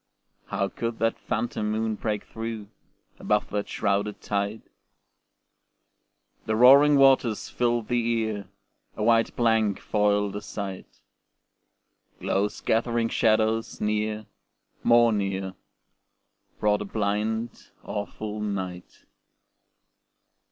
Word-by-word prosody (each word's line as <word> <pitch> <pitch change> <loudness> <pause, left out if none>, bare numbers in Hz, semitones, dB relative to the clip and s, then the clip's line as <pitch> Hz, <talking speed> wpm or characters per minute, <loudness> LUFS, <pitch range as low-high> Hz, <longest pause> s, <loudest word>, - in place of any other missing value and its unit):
How 100 - -1
could 115 +2 -4
that 115 0 0
phantom 110 -3 -2
moon 110 +1 -1
break 105 -1 -3
through, 110 -2 -6 0.5
Above - - 0
that 105 0 -2
shrouded 100 +1 -1
tide? 100 +1 -2 1.8
The 110 - +1
roaring 140 +5 +7
waters 135 -5 +4
filled 120 -2 0
the 120 -1 +1
ear, 110 -4 -3 0.5
A 105 - -2
white 115 0 +3
blank 110 -4 +2
foiled 105 -1 +1
the 105 - -5
sight. 95 -2 -7 1.2
Close 100 +1 -1
gathering 115 0 +1
shadows 110 0 +1
near, 105 0 -1 0.6
more 120 -1 +5
near, 95 -2 -2 1.1
Brought 105 -1 +2
the 105 - -4
blind, 110 +3 -2
awful 105 +1 -5
night. 95 -4 -5
110 Hz, 100 wpm, -26 LUFS, 105-115 Hz, 1.8 s, roaring